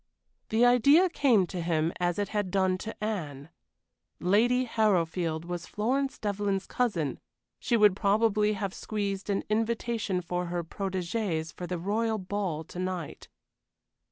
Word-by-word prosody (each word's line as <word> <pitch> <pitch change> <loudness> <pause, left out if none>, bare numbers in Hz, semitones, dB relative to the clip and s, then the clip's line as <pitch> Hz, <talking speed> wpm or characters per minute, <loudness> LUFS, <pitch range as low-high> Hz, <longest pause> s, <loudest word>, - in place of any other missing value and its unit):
The 225 +3 +4
idea 280 +9 +6
came 245 - +3
to 180 0 -5
him 165 -1 0
as 175 -1 0
it 205 -1 -1
had 205 -3 -1
done 190 -1 +1
to 220 0 -7
Anne. 155 -9 -4 0.7
Lady 235 +7 +3
Harrowfield 175 -7 0
was 175 -1 -5
Florence 265 +6 -1
Devlyn's 200 -2 -1
cousin; 170 - -1 0.4
she 240 -2 +1
would 210 -3 +5
probably 210 +1 +2
have 200 -2 -3
squeezed 200 -2 -3
an 200 - 0
invitation 225 -2 -1
for 180 0 -3
her 175 0 -2
protégées 185 -2 -3
for 180 - -6
the 180 - -3
royal 220 +5 0
ball 190 -5 -3
to 175 +2 -9
night. 185 -4 -4
200 Hz, 140 wpm, -28 LUFS, 175-220 Hz, 0.7 s, idea